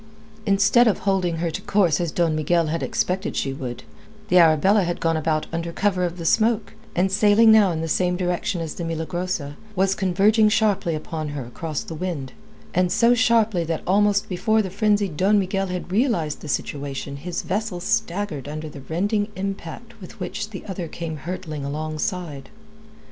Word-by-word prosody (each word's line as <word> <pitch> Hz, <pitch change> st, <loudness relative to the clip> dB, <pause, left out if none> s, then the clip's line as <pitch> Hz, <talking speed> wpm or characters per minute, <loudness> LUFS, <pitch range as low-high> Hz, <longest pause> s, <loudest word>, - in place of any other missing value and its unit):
Instead 200 Hz, +5 st, +5 dB
of 215 Hz, -, +3 dB
holding 190 Hz, -4 st, 0 dB
to -, -, -5 dB
her 170 Hz, -1 st, 0 dB
course 175 Hz, 0 st, +1 dB
as 170 Hz, -2 st, -1 dB
Don 165 Hz, -3 st, +1 dB
Miguel 165 Hz, +2 st, +2 dB
had 160 Hz, +2 st, -2 dB
expected 190 Hz, +2 st, -1 dB
she 135 Hz, -, -1 dB
would, 125 Hz, -2 st, -6 dB, 0.5 s
the 180 Hz, -, +6 dB
Arabella 170 Hz, +6 st, +5 dB
had 175 Hz, 0 st, -2 dB
gone 165 Hz, 0 st, +1 dB
about 155 Hz, 0 st, 0 dB
under 170 Hz, 0 st, -2 dB
cover 185 Hz, 0 st, 0 dB
of 175 Hz, 0 st, -2 dB
the 165 Hz, -, -6 dB
smoke, 220 Hz, +4 st, +2 dB, 0.2 s
and 185 Hz, +2 st, +2 dB
sailing 210 Hz, +3 st, +5 dB
now 215 Hz, -3 st, +6 dB
in 160 Hz, -2 st, -2 dB
the 165 Hz, -, -2 dB
same 180 Hz, +2 st, +1 dB
direction 180 Hz, -1 st, -1 dB
as 160 Hz, -2 st, -4 dB
the 170 Hz, -, -6 dB
Milagrosa, 165 Hz, -2 st, -3 dB, 0.2 s
was 190 Hz, +1 st, +2 dB
converging 205 Hz, +3 st, +3 dB
sharply 205 Hz, -6 st, +1 dB
upon 155 Hz, 0 st, -4 dB
her 130 Hz, -, -4 dB
across 150 Hz, +5 st, -4 dB
the -, -, -7 dB
wind, 160 Hz, -5 st, -4 dB, 0.5 s
so 235 Hz, +6 st, +4 dB
sharply 225 Hz, -6 st, +3 dB
that 165 Hz, -1 st, -3 dB
almost 200 Hz, +1 st, +3 dB
before 220 Hz, +4 st, +1 dB
the 190 Hz, -, -5 dB
frenzied 205 Hz, -4 st, +1 dB
Don 200 Hz, +5 st, +4 dB
Miguel 195 Hz, 0 st, 0 dB
had 180 Hz, 0 st, -5 dB
realized 195 Hz, -, 0 dB
the -, -, -8 dB
situation, 140 Hz, 0 st, -3 dB
his 175 Hz, +5 st, -4 dB
vessel 200 Hz, -1 st, -2 dB
staggered 180 Hz, -, -2 dB
under 155 Hz, +1 st, -5 dB
the 145 Hz, -, -10 dB
rending 205 Hz, +9 st, -1 dB
impact 195 Hz, +4 st, -6 dB
with 180 Hz, -, -11 dB
which 205 Hz, +3 st, -4 dB
the 195 Hz, -4 st, -8 dB
other 185 Hz, -4 st, -5 dB
came 160 Hz, -1 st, -5 dB
hurtling 155 Hz, -2 st, -5 dB
alongside. 155 Hz, 0 st, -4 dB
180 Hz, 175 wpm, -23 LUFS, 160-205 Hz, 0.5 s, the